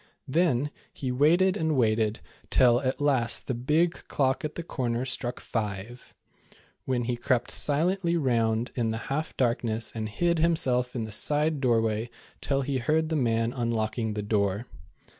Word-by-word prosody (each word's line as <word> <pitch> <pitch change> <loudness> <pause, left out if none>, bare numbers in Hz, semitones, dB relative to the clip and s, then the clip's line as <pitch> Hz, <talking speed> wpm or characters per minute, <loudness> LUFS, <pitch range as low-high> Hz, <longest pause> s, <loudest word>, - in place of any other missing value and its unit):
Then 145 -2 +1 0.2
he 130 -2 -4
waited 170 +9 +4
and 160 -6 0
waited, 110 -2 +1 0.3
till 120 -2 +5
at 130 -1 -1
last 135 -5 +1
the 130 - -2
big 150 +8 +2 0.2
clock 135 -2 0
at 155 0 -4
the 170 - -4
corner 125 -5 -2
struck 125 -1 -3
''five,'' 110 +2 -5 0.7
when 125 -2 0
he 120 +1 -1
crept 120 0 0
silently 170 +4 +1
round 115 -5 +1
in 115 -3 0
the 110 - -2 0.2
half 155 +3 -3
darkness 115 -3 0
and 110 -1 -4
hid 170 +9 +1
himself 130 -7 +1
in 115 - -1
the 110 - -6
side 150 +6 0
doorway 115 -2 +1 0.3
till 135 -1 0
he 135 -1 -1
heard 155 +5 +1
the 160 - 0
man 115 -3 +1
unlocking 110 -2 -1
the 105 - -3
door. 100 +1 0
125 Hz, 160 wpm, -27 LUFS, 115-150 Hz, 0.7 s, till